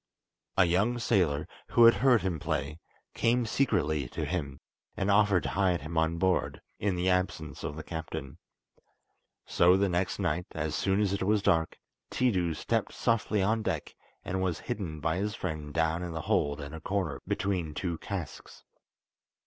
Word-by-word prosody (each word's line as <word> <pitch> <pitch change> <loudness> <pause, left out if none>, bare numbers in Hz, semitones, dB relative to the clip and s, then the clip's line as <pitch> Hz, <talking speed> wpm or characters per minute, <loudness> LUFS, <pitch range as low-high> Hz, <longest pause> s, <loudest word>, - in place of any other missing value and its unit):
A 95 - +6
young 100 +8 +2
sailor, 90 -11 +1 0.2
who 120 - +4
had 115 - +9
heard 125 -4 +5
him 90 -4 -1
play, 75 +3 -3 0.3
came 120 +1 +2
secretly 80 - 0
to 75 - -3
him, 70 -4 -3 0.4
and 100 +1 +1
offered 100 -2 +4
to - - -2
hide 95 -3 +1
him 80 +4 -7
on 80 +1 +1
board, 95 +1 +1 0.2
in 100 -2 0
the 90 +1 -1
absence 90 -5 -1
of 75 - -4
the 80 - -6
captain. 80 -3 -6 1.1
So 90 +2 +4
the 100 0 +2
next 90 +1 0
night, 90 -2 -1
as 80 -1 -2
soon 95 +8 +1
as 100 -2 +1
it 100 - -2
was 105 +1 +2
dark, 80 -4 +2 0.3
Tiidu 90 -10 +1
stepped - - -1
softly 110 -3 +1
on 110 +3 +1
deck, - - -3 0.3
and 95 +1 -2
was 90 -3 -1
hidden 80 -7 -4
by 80 +2 0
his 105 +3 -2
friend 80 -6 -4
down 80 +2 0
in 90 -2 -4
the 80 - -3
hold 75 -1 0
in 70 +1 -7
a 80 - -7
corner 90 -6 -2
between 90 -6 -1
two 85 -1 -3
casks. 90 -7 -7
90 Hz, 175 wpm, -29 LUFS, 80-100 Hz, 1.1 s, had